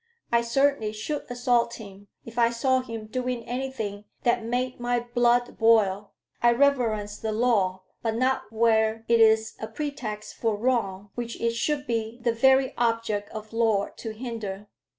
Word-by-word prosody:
I 235 0 +4
certainly 235 -2 +1
should 260 +8 -4
assault 245 -1 +1
him 200 -2 -12 0.2
if 230 +1 -6
I 235 0 +5
saw 260 +2 +1
him 230 -4 -6
doing 250 +1 -3
anything 240 -5 -4 0.2
that 240 -1 +2
made 250 +2 -2
my 245 0 0
blood 240 0 +1
boil: 210 -3 +3 0.3
I 240 0 +5
reverence 235 -6 +1
the 220 - -2
law, 210 -5 +1 0.2
but 225 -1 -1
not 255 -3 0
where 220 0 +2
it 235 0 +4
is 220 0 +4
a 220 - -4
pretext 225 -5 -5
for 225 -3 0
wrong, 205 -5 -1
which 235 -1 -5
it 230 0 0
should 285 +5 -1
be 230 -2 -2
the 235 -1 +1
very 265 +3 +4
object 230 -3 0
of 215 0 -8
law 220 -3 +2
to 225 - -6
hinder. 215 -4 -6
230 Hz, 160 wpm, -26 LUFS, 215-245 Hz, 0.3 s, I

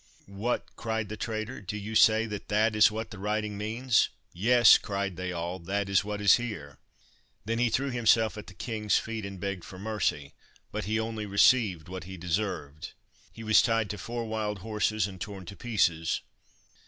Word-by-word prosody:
"What!" 100 +5 -2
cried 110 -3 -3
the 110 - -4
traitor, 110 +3 -4
"do 100 +1 -5
you 105 +2 -6
say 110 0 +5
that 105 -3 -6
that 105 +1 +2
is 105 - +7
what 110 +1 -5
the 100 - -9
writing 105 +1 -2
means?" 110 +4 +1 0.2
"Yes," 120 +6 +6
cried 100 -2 -3
they 90 +1 -4
all. 85 +1 -4
"That 100 +3 -2
is 100 0 +3
what 105 0 -4
is 105 - +6
here." 105 - -6 0.7
Then 115 +2 -1
he 120 -1 +3
threw 135 +4 0
himself 115 -2 +3
at 105 - -9
the 95 - -12
king's 110 -1 0
feet 110 -2 -4
and 100 -1 -8
begged 100 -2 -4
for 95 - -10
mercy, 95 -9 -2 0.4
but - - -3
he 110 +3 0
only 110 -1 -3
received 100 -4 +3
what 95 0 -7
he 95 +1 -8
deserved. 85 -4 -3 0.4
He 115 - -10
was 110 0 +6
tied 115 -2 +1
to 105 - -6
four 115 +5 -4
wild 110 -2 -2
horses 110 -1 0
and 95 -3 -8
torn 100 -3 -6
to 100 - -9
pieces. 90 -9 0
105 Hz, 190 wpm, -28 LUFS, 95-110 Hz, 0.7 s, is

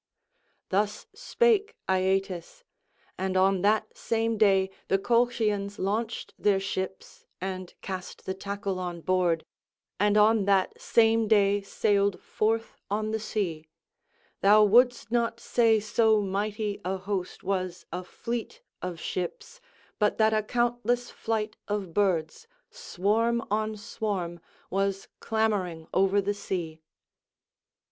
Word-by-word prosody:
Thus 205 +2 0
spake 475 -4 +2
Aeetes; 190 - -1 0.6
and 190 0 0
on 190 0 +3
that 210 +2 +1
same 225 0 0
day 195 -3 +3 0.2
the 195 - +3
Colchians 215 -2 +1
launched 220 +4 -2
their 200 -2 +3
ships 190 -1 -5
and 185 -1 -5
cast 185 -1 -6
the 190 - -2
tackle 200 0 -4
on 175 -2 -4
board, 175 -2 +1 0.5
and 205 +1 +3
on 210 -1 +5
that 195 -2 +1
same 225 -1 +3
day 205 -1 +4
sailed 200 0 +1
forth 225 +1 -1
on 215 +2 -1
the 220 - -1
sea; 170 -8 -3 0.7
thou 210 +2 +7
wouldst 240 +2 +4
not 235 -1 0
say 230 -2 +3
so 220 +1 +3
mighty 205 +1 -2
a 190 +1 -1
host 190 -1 -4
was 185 -2 -2
a 180 - -4
fleet 235 - -5 0.2
of 180 -2 -5
ships, 185 - -5 0.4
but 210 -1 +2
that 220 0 +4
a 215 - +3
countless 240 +1 0
flight 220 -1 -3
of 205 -5 -3
birds, 190 - 0 0.2
swarm 230 - 0
on 215 0 0
swarm, 200 -5 -3 0.3
was 195 0 -1
clamouring 200 -7 -1
over 195 +1 +3
the 200 +1 -1
sea. 170 -5 -4
205 Hz, 120 wpm, -27 LUFS, 190-220 Hz, 0.7 s, thou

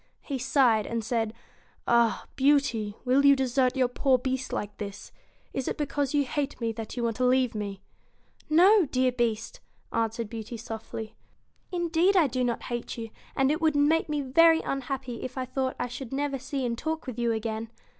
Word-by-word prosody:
He 275 -3 -4
sighed, 245 -5 +3
and 230 -1 -2
said: 225 -1 -1 0.6
'Ah! 235 -1 +3
Beauty, 265 -7 +2
will 260 +3 +4
you 280 0 +7
desert 260 -1 +1
your 260 -2 +3
poor 255 +1 +2
Beast 260 +1 -3
like 205 0 -3
this? 200 -1 -7 0.4
Is 265 - -3
it - - -2
because 285 -2 -1
you 285 -1 +3
hate 285 +2 -3
me 230 -1 -1
that 225 +1 -7
you 240 - -1
want 230 -2 -1
to 255 - 0
leave 250 -1 +3
me? 200 -2 -5 0.2
' - - -39
' - - -31
No, 395 -3 +6
dear 255 0 +2
Beast,' 230 -3 -2 0.3
answered 230 0 -1
Beauty, 225 +1 -6
softly. 220 -1 -7 0.3
' - - -42
Indeed 345 +2 +2
I 340 - +6
do 255 -1 -1
not 240 -1 -1
hate 240 -1 -4
you, 225 -1 -6 0.2
and 270 +1 +3
it 310 +2 -1
would 315 -2 +3
make 300 +3 +3
me 295 -1 0
very 325 +5 +5
unhappy 265 -3 -4
if 255 +1 -6
I 260 - -1
thought 260 +1 -2
I - - -1
should 245 0 -7
never 275 0 -1
see 265 0 -3
and 235 -1 -1
talk 315 +5 -3
with 255 -3 -6
you 235 -1 +1
again. 220 0 -3
255 Hz, 200 wpm, -27 LUFS, 230-280 Hz, 0.6 s, you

